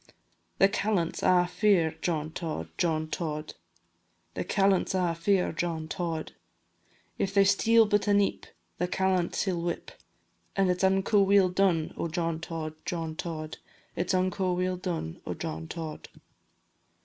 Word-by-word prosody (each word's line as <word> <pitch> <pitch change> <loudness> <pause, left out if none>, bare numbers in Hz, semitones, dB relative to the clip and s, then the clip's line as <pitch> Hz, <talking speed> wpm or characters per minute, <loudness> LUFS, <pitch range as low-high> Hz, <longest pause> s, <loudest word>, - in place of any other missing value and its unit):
The 195 - +6
callants 200 -4 -1
a' 180 -1 +4
fear 180 -4 +2
John 155 -3 -1
Tod, 160 -1 -4
John 160 -3 +1
Tod, 155 -2 -4 0.8
The - - -3
callants 195 -1 +2
a' 180 -2 +1
fear 180 +3 +1
John 160 -1 -3
Tod; 165 -1 -3 0.9
If 195 +1 -1
they 200 - +7
steal 225 +3 +5
but 210 0 +1
a - - +2
neep, 200 -1 +1 0.3
The 180 - +1
callant 185 -1 0
he 195 - 0
'll 170 -2 -2
whip, 170 0 -3 0.6
And 195 -2 +3
it 180 - -2
's - - -2
unco 195 +2 +3
weel 195 -1 +5
done 180 -4 +1
o' - - -2
John 165 -1 -2
Tod, 165 -2 -5
John 165 -2 -3
Tod, 155 -2 -5 0.4
It 175 +1 -2
's - - +3
unco 185 0 +1
weel 180 +1 0
done 170 - -4
o' - - -2
John 80 +1 -5
Tod. 160 - -7
180 Hz, 155 wpm, -28 LUFS, 165-195 Hz, 0.9 s, they